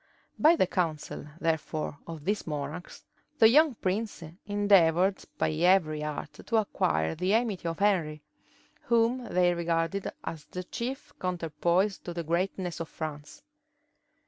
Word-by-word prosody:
By 315 Hz, +3 st, +6 dB
the 320 Hz, -, +3 dB
counsel, 160 Hz, -6 st, -2 dB
therefore, 160 Hz, -2 st, -2 dB
of 160 Hz, -3 st, -8 dB
these 205 Hz, -1 st, -1 dB
monarchs, 150 Hz, +3 st, -5 dB, 0.3 s
the 220 Hz, -, +8 dB
young 295 Hz, +3 st, +5 dB
prince 200 Hz, -1 st, -2 dB, 0.2 s
endeavored 195 Hz, -3 st, +3 dB
by -, -, +1 dB
every 155 Hz, -2 st, +3 dB
art 150 Hz, 0 st, -5 dB
to 230 Hz, -, 0 dB
acquire 80 Hz, -, +1 dB
the 185 Hz, +5 st, +1 dB
amity 220 Hz, -7 st, 0 dB
of 165 Hz, -, -2 dB
Henry, 170 Hz, -7 st, +1 dB, 0.6 s
whom 235 Hz, +2 st, +2 dB
they 180 Hz, -4 st, +2 dB
regarded 170 Hz, +3 st, -1 dB
as 155 Hz, -3 st, -6 dB
the 180 Hz, -, -6 dB
chief 245 Hz, +8 st, -5 dB
counterpoise 180 Hz, +2 st, 0 dB
to 175 Hz, -, -7 dB
the 170 Hz, -, -2 dB
greatness 175 Hz, +2 st, -1 dB
of 165 Hz, -, -5 dB
France. 150 Hz, -2 st, -7 dB
175 Hz, 135 wpm, -29 LUFS, 160-205 Hz, 0.6 s, the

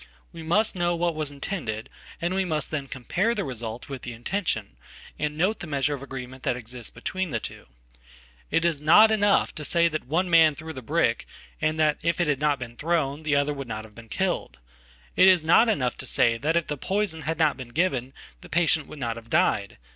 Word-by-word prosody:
We 165 Hz, -, -8 dB
must 200 Hz, +7 st, +2 dB
know 175 Hz, -1 st, +1 dB
what 170 Hz, 0 st, 0 dB
was 155 Hz, -2 st, -1 dB
intended, 135 Hz, -, -4 dB, 0.3 s
and 170 Hz, +2 st, -1 dB
we 190 Hz, 0 st, +1 dB
must 155 Hz, -4 st, -1 dB
then 145 Hz, -3 st, -3 dB
compare 185 Hz, -, -1 dB
the 205 Hz, -, -1 dB
resultwith 120 Hz, 0 st, -6 dB
the 120 Hz, -, -6 dB
intention, 120 Hz, -, -2 dB, 0.4 s
and 150 Hz, 0 st, -2 dB
note 190 Hz, +7 st, +1 dB
the 175 Hz, -, -6 dB
measure 140 Hz, -1 st, 0 dB
of 140 Hz, -, -5 dB
agreement 130 Hz, -1 st, -8 dB
that 125 Hz, -, 0 dB
existsbetween 125 Hz, -, -5 dB
the 115 Hz, -5 st, -1 dB
two. -, -, -8 dB, 0.8 s
It 165 Hz, -, +1 dB
is 160 Hz, -4 st, +1 dB
not 210 Hz, +9 st, +7 dB
enough 205 Hz, -2 st, +3 dB
to 155 Hz, -, -6 dB
say 170 Hz, +2 st, +3 dB
that 155 Hz, -3 st, -4 dB
one 175 Hz, +6 st, +1 dB
man 165 Hz, -3 st, +5 dB
threw 160 Hz, +2 st, -7 dB
thebrick, 130 Hz, -5 st, 0 dB, 0.3 s
and 155 Hz, 0 st, 0 dB
that, 155 Hz, -1 st, +2 dB
if 170 Hz, 0 st, 0 dB
it 175 Hz, -, +3 dB
had 145 Hz, -3 st, 0 dB
not 150 Hz, -1 st, +2 dB
been 120 Hz, -2 st, -8 dB
thrown, 155 Hz, -3 st, 0 dB
the 155 Hz, -2 st, 0 dB
other 145 Hz, +1 st, +2 dB
would 135 Hz, -2 st, -6 dB
nothave 110 Hz, -1 st, -7 dB
been 115 Hz, 0 st, -13 dB
killed. 60 Hz, -, -2 dB, 0.6 s
It 190 Hz, -, +7 dB
is 180 Hz, -4 st, +4 dB
not 175 Hz, +9 st, +5 dB
enough 130 Hz, -, 0 dB
to -, -, -3 dB
say 120 Hz, -, +3 dB
if 155 Hz, +8 st, 0 dB
the 150 Hz, -, -4 dB
poison 190 Hz, 0 st, -1 dB
had 160 Hz, +1 st, -2 dB
notbeen 140 Hz, -6 st, 0 dB
given 135 Hz, -5 st, 0 dB, 0.3 s
the -, -, -13 dB
patient 160 Hz, -3 st, +2 dB
would -, -, -10 dB
not 115 Hz, -4 st, -3 dB
have 115 Hz, 0 st, -11 dB
died. -, -, +1 dB
150 Hz, 205 wpm, -26 LUFS, 130-170 Hz, 0.8 s, not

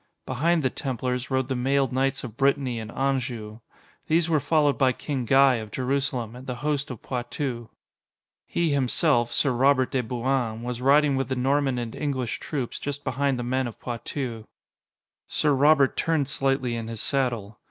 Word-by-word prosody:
Behind 160 Hz, +5 st, +1 dB
the 130 Hz, -, +1 dB
Templars 125 Hz, -1 st, -3 dB
rode 130 Hz, -2 st, 0 dB
the 135 Hz, -, -1 dB
mailed 135 Hz, +1 st, +1 dB
knights 135 Hz, +1 st, 0 dB
of 115 Hz, -4 st, -7 dB
Brittany 135 Hz, -2 st, +1 dB
and 110 Hz, -1 st, -7 dB
Anjou. 125 Hz, -5 st, -2 dB, 0.5 s
These 165 Hz, +1 st, +2 dB
were 155 Hz, -, +4 dB
followed 145 Hz, 0 st, +2 dB
by 130 Hz, -2 st, +3 dB
King 135 Hz, -3 st, -3 dB
Guy 135 Hz, +1 st, +5 dB
of 110 Hz, -1 st, -6 dB
Jerusalem 130 Hz, -1 st, -2 dB
and 130 Hz, +2 st, -11 dB
the 125 Hz, -, -3 dB
host 145 Hz, 0 st, 0 dB
of 125 Hz, -5 st, -8 dB
Poitou. 120 Hz, -1 st, -4 dB, 0.8 s
He 170 Hz, -3 st, 0 dB
himself, 135 Hz, -2 st, +2 dB
Sir 140 Hz, -, +2 dB
Robert 130 Hz, +1 st, +3 dB
de 130 Hz, -, +1 dB
Bouain, 120 Hz, -1 st, -1 dB
was 125 Hz, 0 st, -4 dB
riding 140 Hz, +1 st, +4 dB
with 135 Hz, -1 st, -1 dB
the 130 Hz, -, 0 dB
Norman 135 Hz, +1 st, +1 dB
and 120 Hz, -2 st, -4 dB
English 130 Hz, -5 st, -2 dB
troops, 135 Hz, -6 st, -4 dB
just 145 Hz, 0 st, -4 dB
behind 135 Hz, +1 st, 0 dB
the 120 Hz, -, -3 dB
men 130 Hz, +1 st, 0 dB
of 115 Hz, -, -9 dB
Poitou. 120 Hz, -1 st, -5 dB, 0.8 s
Sir 150 Hz, -1 st, +1 dB
Robert 140 Hz, 0 st, +4 dB
turned 160 Hz, -4 st, +1 dB
slightly 135 Hz, -3 st, 0 dB
in 115 Hz, -1 st, -4 dB
his 115 Hz, -1 st, -5 dB
saddle. 120 Hz, -7 st, -1 dB
130 Hz, 175 wpm, -25 LUFS, 120-140 Hz, 0.8 s, Guy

